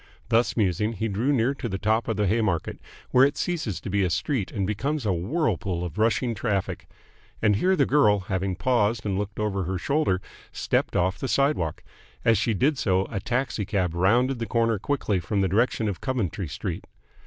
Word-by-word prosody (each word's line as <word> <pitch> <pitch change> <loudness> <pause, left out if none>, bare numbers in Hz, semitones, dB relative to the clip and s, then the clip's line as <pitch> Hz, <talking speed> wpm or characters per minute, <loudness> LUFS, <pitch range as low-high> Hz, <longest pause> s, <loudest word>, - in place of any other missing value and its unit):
Thus 115 0 +2
musing, 105 +1 +1
he 110 +1 -2
drew 110 +7 0
near 130 0 +2
to 125 -4 -5
the 95 - -2
top 110 +3 +1
of 110 - -1
the 105 - +2
Haymarket, 105 -4 0 0.3
where 130 - +6
it 140 +1 +2
ceases 155 - -2
to - - -6
be 100 0 +2
a 90 - +1
street 115 - -1
and 100 -3 -1
becomes 130 +7 -2
a 100 - +2
whirlpool 95 - -1
of 85 +3 -6
rushing 115 +2 +2
traffic. 100 -3 -2 0.5
And 105 -2 +3
here 190 - +3
the 140 -6 +3
girl, 105 -9 +4
having 95 0 -2
paused 110 0 +1
and 100 -2 0
looked 100 +1 -4
over 100 -3 -1
her 95 +2 -2
shoulder, 140 - +1 0.3
stepped - - -1
off 95 +3 +1
the 135 - -2
sidewalk. 135 - 0 0.4
As 115 -3 +4
she 115 0 +1
did 140 +6 +1
so 95 -1 +2
a 105 - -2
taxi 120 0 -1
cab 95 -4 -1
rounded 120 +9 +2
the 115 - -3
corner 115 -3 +1
quickly 105 -5 0
from 100 +4 -1
the 95 - +2
direction 110 +3 +1
of 100 - -3
Coventry 105 - -2
Street. 75 - -5
105 Hz, 200 wpm, -25 LUFS, 95-125 Hz, 0.5 s, where